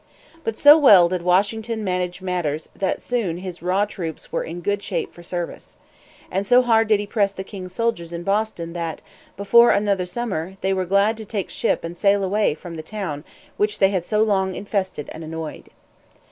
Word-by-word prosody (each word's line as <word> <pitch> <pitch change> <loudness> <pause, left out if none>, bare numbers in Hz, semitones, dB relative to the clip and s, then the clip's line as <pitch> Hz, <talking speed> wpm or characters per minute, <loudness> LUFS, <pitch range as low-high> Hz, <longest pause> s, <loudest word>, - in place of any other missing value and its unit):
But 225 -1 -3
so 295 +2 +8
well 195 - +7
did 180 -1 -2
Washington 215 +5 +1
manage 180 -1 -2
matters 165 -5 -2
that 190 - -2
soon 220 -9 -1
his 180 -1 -7
raw 185 +4 +1
troops 170 -6 -7
were - - -1
in 170 +2 -7
good 205 +3 -1
shape - - -3
for 175 - -13
service. 175 0 -6 0.5
And 195 +2 -1
so 250 +1 +6
hard 225 -2 +3
did 215 -2 +3
he 205 - -3
press 205 -1 +1
the 190 -1 -7
king's 185 -2 -9
soldiers 230 -8 -1
in 170 0 -5
Boston 195 -4 -1
that, 170 -2 -4 0.3
before 235 +4 +6
another 200 -3 +1
summer, 190 -4 -4
they 190 0 +1
were 185 -1 -1
glad 200 +4 +2
to 220 - -7
take 200 -3 -4
ship - - 0
and 165 +1 -6
sail 200 +2 +2
away 200 -4 +1
from 170 0 -9
the - - -5
town 155 -5 -5 0.3
which 210 0 0
they 195 - +4
had 185 -3 -1
so 210 +4 +1
long 190 -3 +1
infested 190 -7 -3
and 160 - -8
annoyed. 160 0 -7
190 Hz, 195 wpm, -22 LUFS, 175-210 Hz, 0.5 s, so